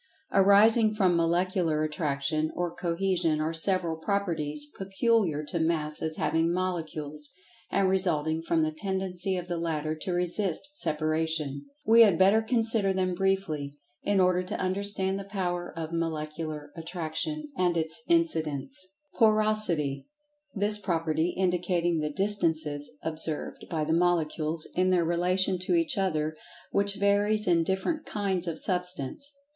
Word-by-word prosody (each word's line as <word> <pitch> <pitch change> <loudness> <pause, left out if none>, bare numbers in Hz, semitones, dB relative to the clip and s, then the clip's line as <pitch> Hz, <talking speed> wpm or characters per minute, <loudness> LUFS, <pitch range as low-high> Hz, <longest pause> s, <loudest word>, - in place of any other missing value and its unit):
Arising 215 +3 +5
from 185 -4 +3
Molecular 170 -1 +1
Attraction, 155 0 -1
or 175 -1 -2
Cohesion, 170 -2 0
are 155 +1 -1
several 170 0 0
"Properties" 160 -6 -2
peculiar 195 -5 0
to 165 +3 -3
Masses 160 -1 -1
having 165 +1 +1
Molecules, 155 -5 -3 0.4
and 195 -1 +2
resulting 165 -4 0
from 165 -1 +1
the 155 - 0
tendency 190 +2 -2
of 180 0 -5
the 175 -2 -3
latter 155 -2 -2
to 160 +4 -4
resist 180 - -1
separation.[Pg 155 - +1
81] 140 - -10 0.2
We 230 0 +7
had 200 -7 +6
better 195 +5 +5
consider 225 -3 +1
them 185 -1 0
briefly, 175 -7 -1 0.2
in 200 -1 +1
order 180 -1 +3
to 185 - -5
understand 190 +1 0
the - - -5
power 180 -3 -3
of 165 0 -5
Molecular 155 -2 -4
Attraction, 170 - -3
and 180 -5 +1
its 160 +7 0
incidents. 190 - -1 0.2
Porosity: 215 - +2 0.5
That 210 +1 +6
property 165 -2 -1
indicating 175 -2 +1
the 150 0 -1
distances 160 -5 0
observed 160 -1 -4
by 160 -2 -1
the 160 +1 0
Molecules 165 -2 0
in 185 +1 +2
their 180 -2 +2
relation 180 +2 +1
to 185 - 0
each 325 -5 +1
other, 155 -6 -1 0.4
which 200 0 +2
varies 205 +1 +2
in 170 -2 +4
different 190 - -2
"kinds" 190 -4 -1
of 165 -1 -3
Substance. 180 - -1
175 Hz, 135 wpm, -28 LUFS, 160-195 Hz, 0.5 s, We